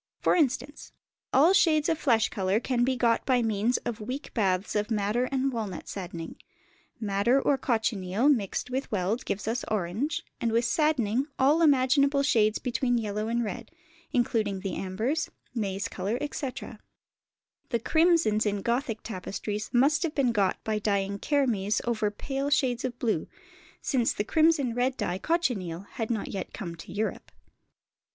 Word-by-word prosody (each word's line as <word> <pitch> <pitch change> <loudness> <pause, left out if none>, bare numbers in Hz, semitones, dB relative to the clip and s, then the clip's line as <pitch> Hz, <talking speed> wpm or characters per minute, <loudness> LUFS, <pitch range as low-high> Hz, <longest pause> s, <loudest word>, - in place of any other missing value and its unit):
For - - +3
instance, 285 -3 -1 0.4
all 310 +8 +5
shades 310 -5 +4
of 325 - +2
flesh 230 -7 +2
colour 195 0 0
can 245 0 0
be 260 +1 +1
got 230 -2 +2
by 250 -2 +2
means 220 +2 +1
of 235 -2 -3
weak 255 +7 -6
baths 190 -3 0
of 210 +1 0
madder 215 +3 +1
and 270 0 -1
walnut 210 -7 -4
"saddening"; 175 -4 -6 0.6
madder 215 +4 +2
or 280 - +2
cochineal 220 -3 0
mixed 245 -3 +1
with 265 +2 -3
weld 205 +3 0
gives 205 - -3
us 235 +2 -1
orange, 215 - -1 0.2
and 230 - 0
with 230 +1 +2
saddening 260 -2 +1
all 290 +5 +4
imaginable 280 -1 +4
shades 220 -6 +3
between 245 0 0
yellow 215 -1 -2
and 235 +1 0
red, 215 +1 -5 0.4
including 215 -5 0
the 195 -1 -3
ambers, 235 - -2 0.2
maize 200 -4 -2
colour, 200 +5 -2
etc. 270 -6 -5 0.9
The 235 - +1
crimsons 315 -7 +3
in 205 -1 -1
Gothic 235 -2 -1
tapestries 210 +1 -4
must 275 +5 +3
have 330 -3 -2
been 265 -4 +2
got 200 -4 +1
by 215 -1 -1
dyeing 200 -1 -1
kermes 230 -9 +1
over 220 -3 0
pale 270 +6 -3
shades 255 -4 +1
of 245 -2 -3
blue, 220 -10 -1 0.6
since 245 -5 +1
the - - -1
crimson 310 -1 +3
red 250 +2 0
dye, 180 +1 -2
cochineal, 205 - -1
had 220 +2 -5
not 225 -4 -2
yet 195 - -5
come 175 -6 -5
to 165 - -10
Europe. 215 +2 -3
235 Hz, 160 wpm, -28 LUFS, 205-270 Hz, 0.9 s, all